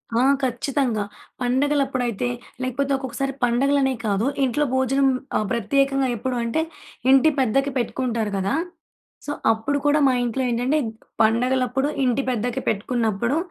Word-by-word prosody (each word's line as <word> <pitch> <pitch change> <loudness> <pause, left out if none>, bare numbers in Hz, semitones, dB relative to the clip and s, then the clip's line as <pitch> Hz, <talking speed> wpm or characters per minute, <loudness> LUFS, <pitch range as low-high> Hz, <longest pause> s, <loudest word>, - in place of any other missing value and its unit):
ఆ! - - +3 0.2
ఖచ్చితంగా 250 -3 0 0.4
పండగలప్పుడైతే 255 -3 0 0.4
లేకపోతే 275 +2 -1
ఒక్కొక్కసారి 270 +1 -3
పండగలనే 265 +3 +2
కాదు 205 +1 +1 0.2
ఇంట్లో 270 +3 +1
భోజనం 270 +1 +2 0.3
ఆహ్, 215 - 0
ప్రత్యేకంగా 275 +4 +1
ఎప్పుడు 250 +3 -3
అంటే, 235 +7 0 0.5
ఇంటి 270 +4 +6
పెద్దకి 270 +3 +2
పెట్టుకుంటారు 235 -3 -1
గదా! 195 +1 0 0.7
సో, 290 - -3 0.2
అప్పుడు 225 +6 -1
కూడా 290 +1 +4
మా 260 - +3
ఇంట్లో 240 +2 -1
ఏంటంటే 245 +5 +1
గ్ - - -5 0.3
పండగలప్పుడు 250 +4 +2 0.2
ఇంటి 255 +1 +2
పెద్దకి 245 0 -1
పెట్టుకున్నప్పుడు 230 +4 0
255 Hz, 125 wpm, -23 LUFS, 235-275 Hz, 0.7 s, ఇంటి